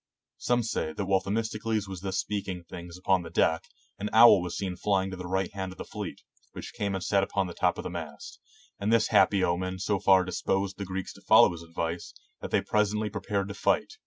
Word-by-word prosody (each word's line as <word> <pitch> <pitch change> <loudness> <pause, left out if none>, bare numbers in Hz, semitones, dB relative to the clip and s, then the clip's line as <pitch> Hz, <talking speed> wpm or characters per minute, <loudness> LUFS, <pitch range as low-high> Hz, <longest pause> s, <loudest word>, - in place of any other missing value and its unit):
Some 120 -1 +1
say 80 -7 -2
that 100 - -3
while 95 0 +3
The 95 - -8
mistocles 110 -1 -1
was 95 -2 -7
thus 95 -1 -3
speaking 95 -2 -3
things 85 0 -9
upon 95 0 +2
the 85 - -8
deck, 80 0 +1 0.3
an 105 +1 -3
owl 115 -4 +8
was 90 -1 -4
seen 95 -2 -3
flying 95 0 0
to - - -5
the 90 -1 -7
right 95 +1 -1
hand 95 -1 -4
of - - -19
the - - -6
fleet, - - -7 0.3
which - - -8
came 100 -1 -2
and 95 - -3
sat 100 +1 +2
upon 95 0 -1
the 90 - -6
top - - +1
of - - -5
the - - -5
mast; 80 -4 -8 0.4
and 100 +2 0
this 115 -2 +3
happy 100 -2 +4
omen 95 +2 -1
so 100 +1 -1
far 95 -1 +5
disposed 95 +1 -2
the 100 - -3
Greeks 95 0 -5
to - - -16
follow - - +6
his 85 -1 -8
advice, 85 +1 -5 0.2
that - - -6
they - - +2
presently 105 0 0
prepared 100 -1 -2
to - - -4
fight. 435 - 0
95 Hz, 230 wpm, -28 LUFS, 90-100 Hz, 0.4 s, owl